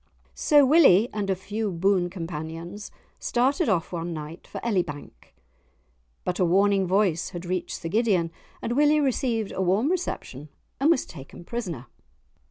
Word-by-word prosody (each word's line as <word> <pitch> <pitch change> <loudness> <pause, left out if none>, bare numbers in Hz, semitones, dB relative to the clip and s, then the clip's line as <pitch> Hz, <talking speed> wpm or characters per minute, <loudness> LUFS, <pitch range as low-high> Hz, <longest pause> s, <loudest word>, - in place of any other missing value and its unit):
So 295 -3 +4
Willie 255 - +6
and 205 -2 -2
a 190 - +2
few 205 +3 -3
boon 180 +1 +1
companions 170 +2 -6 0.3
started 265 +5 +1
off 175 -5 0
one 170 -1 -3
night 155 +2 -8
for - - -7
Elibank. 170 - -3 0.9
But 180 - -2
a - - +4
warning 195 +2 +3
voice 185 -3 +1
had 175 -1 -7
reached 180 0 -3
Sir 165 - -5
Gideon, 190 -5 +1 0.3
and - - -2
Willie 295 +2 +4
received 245 -6 0
a - - -3
warm 200 - +2
reception, 155 - -4 0.3
and 280 +4 +3
was 335 - +3
taken 155 +2 -11
prisoner. 180 - -5
190 Hz, 150 wpm, -25 LUFS, 170-235 Hz, 0.9 s, Willie